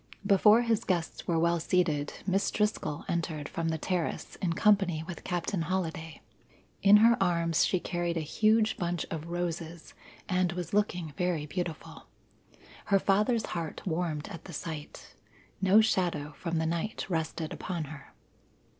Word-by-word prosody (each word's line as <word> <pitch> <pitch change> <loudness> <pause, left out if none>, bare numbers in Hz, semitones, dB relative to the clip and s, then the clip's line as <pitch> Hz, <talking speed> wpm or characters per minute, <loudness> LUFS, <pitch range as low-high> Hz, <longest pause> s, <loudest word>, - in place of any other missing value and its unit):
Before 210 +3 +6
his 230 -3 +1
guests 175 -4 -2
were 170 - +1
well 170 +1 +2
seated, 160 -4 +1
Miss 195 +1 +1
Driscoll 210 -8 -1
entered 160 -4 -2
from 165 -1 -2
the 160 - -1
terrace 175 +1 -2
in 170 -3 -1
company 190 -5 +3
with 175 0 -8
Captain 175 0 -2
Holliday. 165 -2 -3 0.6
In 200 +1 +8
her 235 0 +6
arms 170 -3 +2
she 185 - +1
carried 175 -1 -2
a - - 0
huge 215 +7 +2
bunch 175 -3 -2
of 160 0 -4
roses 170 -1 -4 0.3
and 185 -2 +1
was 175 -1 -5
looking 180 -7 0
very 175 -4 0
beautiful. 165 +1 -5 0.8
Her 200 - +4
father's 210 +4 +2
heart 165 -3 -5
warmed 160 -4 -2
at 170 - -9
the 175 - -9
sight. 155 0 -7 0.5
No 195 +3 +6
shadow 175 -8 0
from 170 0 -3
the 160 - 0
night 170 +6 -2
rested 160 -2 -2
upon 175 -3 -4
her. 150 -1 -11
175 Hz, 150 wpm, -29 LUFS, 160-190 Hz, 0.8 s, In